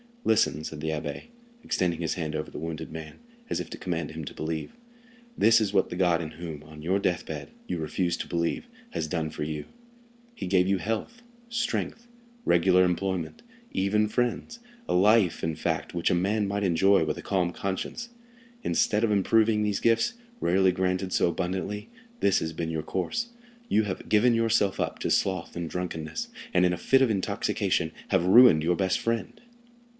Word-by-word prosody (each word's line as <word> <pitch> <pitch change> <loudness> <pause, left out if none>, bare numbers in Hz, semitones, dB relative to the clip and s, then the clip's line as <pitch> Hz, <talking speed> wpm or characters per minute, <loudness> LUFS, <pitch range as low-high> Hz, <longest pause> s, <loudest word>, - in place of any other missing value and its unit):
"Listen," 80 -8 +2
said 75 -1 -6
the 80 - -2
abbé, 75 -2 -4 0.4
extending 90 -3 0
his 80 - 0
hand 80 -3 -3
over 75 - -3
the - - -7
wounded 80 0 -5
man, 80 -1 -8 0.3
as - - -1
if - - -5
to - - -6
command 85 -4 -3
him 80 0 -6
to - - -8
believe; 80 0 -3 0.7
"this 115 +1 +6
is 105 -2 0
what 95 - +3
the - - -5
God 90 -2 +2
in 80 -1 -5
whom, 80 -3 -7
on 75 0 -12
your 95 +4 +1
death 90 -3 0
bed, 75 -3 -6 0.2
you 90 - -2
refuse 85 +3 -1
to - - -5
believe, 85 - -1 0.2
has 80 - -2
done 80 -1 -2
for 75 - -4
you—he 235 - -9
gave 90 0 +3
you 100 0 +2
health, 115 - -3 0.3
strength, 235 0 -2 0.4
regular 90 +1 +5
employment, 90 -2 -1 0.3
even 105 +3 +2
friends—a 235 - -3
life, 100 -1 +4
in 80 -1 -1
fact, - - -2
which 85 - +1
a - - +3
man 100 +4 +1
might 100 +1 -1
enjoy 95 +1 +4
with 75 - -2
a - - -8
calm 90 -3 0
conscience. 100 - -4 0.5
Instead 105 +2 +2
of 115 - +2
improving 105 +2 +3
these 105 -2 0
gifts, 115 - +2 0.3
rarely 95 +2 +3
granted 90 +1 -1
so - - +3
abundantly, 95 +4 -3 0.3
this 100 - +4
has 80 0 -3
been 80 0 -3
your 80 -1 -2
course—you 235 - -2
have 100 -3 -5
given 115 +3 +4
yourself 115 -3 +2
up - - -1
to - - -2
sloth 95 -3 0
and 85 -1 -3
drunkenness, 80 -3 -4 0.3
and 90 - +4
in 90 - +2
a - - -2
fit 135 +8 +3
of 125 - +3
intoxication 100 -4 0 0.2
have 95 -3 +2
ruined 95 -5 +7
your 90 +2 +2
best 95 -1 +1
friend." 115 0 -2
95 Hz, 180 wpm, -27 LUFS, 80-110 Hz, 0.7 s, ruined